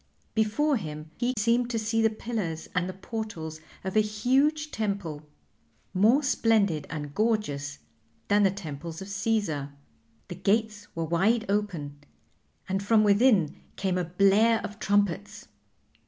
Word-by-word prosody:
Before 240 +7 +2
him 155 -4 -7
he 250 +1 0
seemed 235 +3 +2
to 235 - -1
see 225 +1 0
the 225 - +4
pillars 215 -8 -4
and 180 0 0
the - - -5
portals 185 -6 -6 0.2
of 190 +1 -4
a - - +6
huge 265 +9 +1
temple, 185 -9 -3 0.6
more 220 +10 +4
splendid 210 - +2
and 145 -2 -5
gorgeous 145 -11 -1 0.5
than 205 +1 +4
the 195 - +5
Temples 165 -2 -6
of - - -10
Caesar. 190 -9 -1 0.5
The - - -6
gates 205 +1 0
were 165 0 -1
wide 205 +8 +2
open, 175 -9 -2 0.7
and 190 +1 -1
from 215 +1 +4
within 205 - +4 0.2
came 190 -2 0
a - - 0
blare 200 +6 +4
of 210 +2 -7
trumpets. 205 +1 0
205 Hz, 140 wpm, -27 LUFS, 170-225 Hz, 0.7 s, a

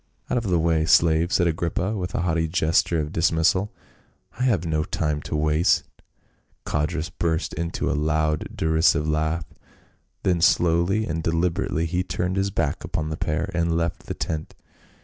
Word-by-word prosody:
"Out - - +2
of 115 - -7
the 90 -2 +2
way, 80 -1 +2
slave," 80 +1 +4
said 90 - +3
Agrippa 85 +5 -1
with 90 -3 -4
a - - 0
haughty 80 -2 0
gesture 80 0 +1
of 75 0 -3
dismissal. 85 +4 +2 0.3
" - - -28
I 130 - +1
have 100 -9 +1
no 80 -2 0
time 75 -1 -2
to 75 - -4
waste." 75 +2 +2 0.8
Codrus 80 +2 -2
burst 80 0 -1
into 85 +1 -3
a - - +1
loud 75 0 0
derisive 80 -1 +2
laugh, 80 +1 0 0.8
then 90 -3 +1
slowly 85 +5 +3
and 80 -2 -3
deliberately 85 0 0
he 90 +2 -1
turned 90 0 -2
his 95 +1 +1
back 80 -6 -2
upon 75 0 -3
the 80 - -3
pair 80 +4 -2
and 85 -1 +1
left 85 0 -3
the - - -4
tent. 80 -1 -4
80 Hz, 170 wpm, -24 LUFS, 80-90 Hz, 0.8 s, slave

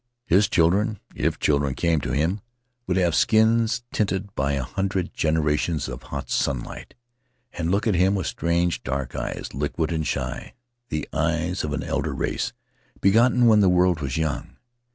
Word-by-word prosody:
His 100 +1 +3
children 100 +6 +2
— - - -27
if - - 0
children 70 -2 +1
came 85 -3 +1
to - - -3
him 85 +8 0 0.2
— 125 0 -50
would 90 0 +1
have 90 -3 +2
skins 115 +3 +3
tinted 100 -1 -1
by 70 -5 0
a 70 -2 -1
hundred 95 +6 -2
generations 75 0 0
of 65 -2 -6
hot - - -7
sunlight, 65 -4 -2 0.6
and 85 -1 -2
look 100 +5 +1
at 110 - +2
him 95 +3 +3
with 95 -4 -2
strange, 85 +7 0
dark 65 -1 -3
eyes, - - -4
liquid 75 +4 -2
and 80 -3 -1
shy 65 -2 -4 0.2
— 120 0 -53
the 75 -1 -3
eyes 85 +3 0
of 75 - -3
an 75 - -2
elder - - -2
race, - - -2 0.5
begotten 120 +5 +4
when 110 -2 +6
the 100 -3 +5
world 90 -1 +3
was 70 -1 -2
young. 80 -2 -3
85 Hz, 175 wpm, -24 LUFS, 75-100 Hz, 0.6 s, when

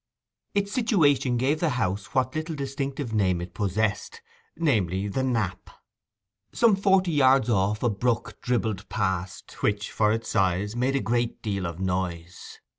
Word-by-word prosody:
Its 200 0 0
situation 145 - +2
gave 140 +5 +1
the 165 - +1
house 100 -2 -2
what 130 +3 +1
little 155 +1 -3
distinctive 135 -2 -4
name 95 -5 +2
it 90 0 -7
possessed, 100 +2 -1 0.4
namely, 100 - +1
'The 105 +6 -2
Knap.' 110 -9 -1 0.8
Some 230 -4 +4
forty 195 -2 +3
yards 130 -4 +4
off 100 +2 +1
a 120 - +3
brook 115 +3 -1
dribbled 110 -5 -1
past, 95 -4 -3
which, 105 -1 0
for 105 -1 +2
its 115 +1 -2
size, 95 +1 0
made 130 +3 0
a 135 - +1
great 120 +3 -1
deal 100 -4 -2
of 85 0 -7
noise. 90 -2 -4
115 Hz, 150 wpm, -26 LUFS, 95-135 Hz, 0.8 s, Some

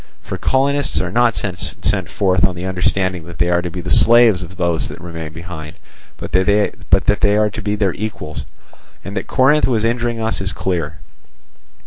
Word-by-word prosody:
For - - -6
colonists 140 +1 +1
are 90 -1 -2
not 120 +1 +3
sent 90 -3 -2
forth 95 -3 +1
on 90 - +2
the 90 +1 -5
understanding 95 -1 -1
that 85 -1 -10
they 85 +2 +1
are 85 0 +2
to 90 - -4
be 90 +1 -6
the 90 +1 -5
slaves 115 -2 +5
of 90 0 -9
those 85 -2 0
that - - -9
remain 85 -2 -7
behind, 80 -1 -8 0.4
but - - -7
that 100 +1 +2
they 105 0 +3
are 105 0 +3
to - - -6
be 105 +1 -1
their 100 -4 0
equals. 105 -7 -5 0.6
And 100 - -6
that 95 - -3
Corinth 140 +3 +3
was 115 -4 +1
injuring 120 0 -1
us 110 -2 -1
is 95 -1 +1
clear. 85 -5 -2
95 Hz, 185 wpm, -18 LUFS, 85-110 Hz, 0.6 s, slaves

